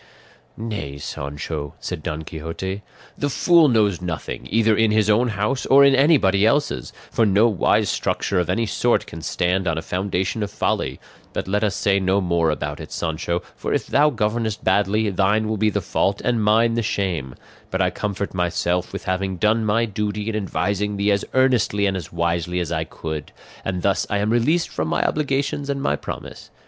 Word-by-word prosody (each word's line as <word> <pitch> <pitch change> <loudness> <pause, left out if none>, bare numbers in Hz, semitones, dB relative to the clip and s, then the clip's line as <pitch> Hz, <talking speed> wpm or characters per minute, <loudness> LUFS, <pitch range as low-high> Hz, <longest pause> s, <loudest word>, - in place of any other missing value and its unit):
'" - - -34
"Nay, 100 -11 -5
Sancho," 70 +1 -5
said - - -5
Don 80 -1 -4
Quixote, 85 +5 -5 0.3
"the 145 - -1
fool 170 +3 +5
knows 105 -6 +2
nothing, 80 -7 -5
either 110 0 +3
in 110 +1 +3
his 110 0 +3
own 120 +4 +3
house 110 +4 -1
or 140 +1 +7
in 140 - +5
anybody 130 - +4
else's, 145 +7 +1 0.2
for 115 - +2
no 105 +2 +4
wise 105 -6 +2
structure 95 - 0
of 90 -1 -1
any 115 +6 +1
sort 120 +2 +1
can 80 - -9
stand 90 +3 0
on 80 -1 0
a 80 - -3
foundation 95 +3 -2
of 105 - -2
folly; - - -1 0.3
but - - -3
let 105 +2 0
us 105 -2 +1
say 100 -1 +2
no 95 +1 +2
more 85 -3 +1
about 75 -1 -3
it, - - -9
Sancho, 85 +1 -2
for - - -2
if - - -1
thou 150 +2 +4
governest 110 -3 -1
badly, 105 +1 +2
thine 105 +3 +2
will 110 - -1
be 110 +1 +2
the 100 -1 -1
fault 95 +3 0
and 120 -3 +1
mine 115 +2 +4
the 115 - 0
shame; 90 - -2 0.3
but - - -2
I - - +2
comfort 100 -1 -3
myself 90 0 0
with 100 - -5
having 95 0 -2
done 110 +3 +2
my 115 +2 +2
duty 105 0 -3
in 115 - -2
advising 100 +1 -1
thee 100 +1 +2
as 100 0 +1
earnestly 125 -6 +3
and 95 -1 +1
as 90 -3 -6
wisely 85 +1 -1
as 85 -2 -3
I 80 -1 -1
could; 80 -2 -6 0.3
and 90 -1 -3
thus 100 - +1
I 105 - +1
am 105 +2 0
released 150 +9 +2
from 80 - -2
my 80 0 0
obligations 140 -1 -1
and 140 -1 -1
my - - +1
promise. - - -8
100 Hz, 195 wpm, -22 LUFS, 90-110 Hz, 0.3 s, or